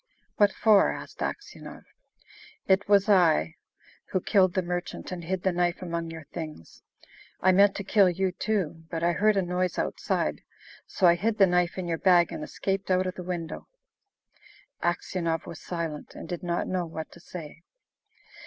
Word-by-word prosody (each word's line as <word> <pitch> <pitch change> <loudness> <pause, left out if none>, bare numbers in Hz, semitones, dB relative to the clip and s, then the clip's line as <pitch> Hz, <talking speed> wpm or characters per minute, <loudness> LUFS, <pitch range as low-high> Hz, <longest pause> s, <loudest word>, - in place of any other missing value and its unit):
"What 205 -1 +5
for?" 210 -2 +4
asked - - -9
Aksionov. 410 - -6 0.8
"It 195 +1 +2
was 200 0 +5
I 165 - +4 0.6
who 185 - 0
killed 185 0 +3
the 185 - +1
merchant 175 +1 -4
and 175 -2 -5
hid 185 +1 -2
the 190 - +2
knife 175 0 0
among 170 -1 -3
your 160 -2 -9
things. 155 - -8 0.6
I 185 - +4
meant 200 +2 +5
to 200 - -4
kill 195 -1 +4
you 185 +1 0
too, 180 -5 -2
but 165 -1 -3
I 170 - +3
heard 210 +4 +2
a 195 - +2
noise 180 +1 -1
outside, - - -1 0.5
so 190 - 0
I 170 - +8
hid 215 +5 -1
the 200 - +7
knife 180 0 +1
in 185 -2 -3
your 165 -1 -2
bag 175 -3 +4
and - - -5
escaped 195 +3 -3
out 185 0 +2
of 185 - -2
the 185 - -8
window." 175 -2 -5 1.1
Aksionov 175 -1 -1
was 165 - -9
silent, 165 -4 -5
and - - -8
did 175 -2 -5
not 175 -1 -2
know 180 -2 -1
what 160 -1 -7
to - - -14
say. 170 -2 -9
180 Hz, 175 wpm, -27 LUFS, 170-190 Hz, 1.1 s, I